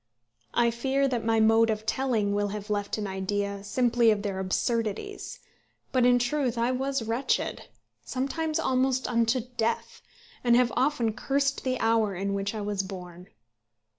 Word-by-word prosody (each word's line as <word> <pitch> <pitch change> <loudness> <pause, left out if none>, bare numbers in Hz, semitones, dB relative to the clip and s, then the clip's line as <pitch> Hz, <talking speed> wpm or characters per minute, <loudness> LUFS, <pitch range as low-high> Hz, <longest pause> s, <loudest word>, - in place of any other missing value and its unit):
I 235 -1 +4
fear 270 +4 +1
that 245 -4 -1
my 225 0 +2
mode 225 +1 +5
of 215 0 -2
telling 225 -6 0
will 205 0 +1
have 210 +1 -5
left 205 0 -1
an 210 - -3
idea 200 +1 -2
simply 240 +1 +2
of 210 -2 +1
their 195 -2 -2
absurdities; 225 - -2 0.5
but 250 -2 +4
in 245 0 +5
truth 245 0 0
I 235 +2 +1
was 270 0 -1
wretched, 230 +4 -1 0.4
sometimes 305 +4 -2
almost 260 0 +1
unto 235 +1 +2 0.2
death, 230 0 -1 0.4
and 240 -1 +5
have 245 -1 +3
often 250 -4 +1
cursed 275 +3 0
the 255 -1 -1
hour 225 -3 +2
in 200 +2 -2
which 200 +2 -2
I 215 - -3
was 205 -1 -1
born. 180 -2 -9
230 Hz, 160 wpm, -27 LUFS, 205-255 Hz, 0.5 s, mode